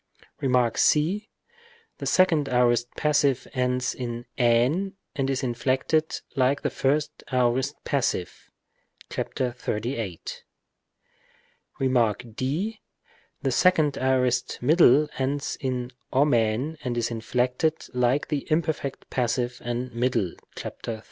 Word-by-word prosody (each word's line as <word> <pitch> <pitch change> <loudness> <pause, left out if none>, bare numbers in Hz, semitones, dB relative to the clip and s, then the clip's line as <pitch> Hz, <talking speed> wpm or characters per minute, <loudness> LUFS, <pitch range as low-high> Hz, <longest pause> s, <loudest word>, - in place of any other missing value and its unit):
Rem. 125 -3 +3
c. 185 +9 +2 0.7
The - - -3
second 160 -7 +3
aorist 120 -1 +3
passive 140 -4 +2
ends 125 -1 0
in 120 -1 -5
ἣν 125 +11 +3 0.2
and 135 -1 0
is 135 0 -1
inflected 130 +6 0
like 135 +1 +2
the - - 0
first 145 +2 0
aorist 130 +2 +1
passive 125 - -2 0.6
(§ 125 -2 -2
38). 110 -6 -4 1.4
Rem. 125 -5 +3 0.2
d. 170 - -2 0.6
The - - +1
second 155 -6 +3
aorist 130 -1 +1
middle 150 0 +5
ends 140 +2 -1
in 125 -2 -2 0.2
ou 145 +2 +3
and 120 +4 0
is 115 0 0
inflected 125 +6 0 0.2
like 125 +3 +1
the 145 -2 -2
imperfect 155 -3 -1
passive 120 0 -1
and 120 +1 -3
middle 115 -5 +1
(§ - - -16 0.2
32). 115 -2 -6
130 Hz, 110 wpm, -26 LUFS, 120-145 Hz, 1.4 s, middle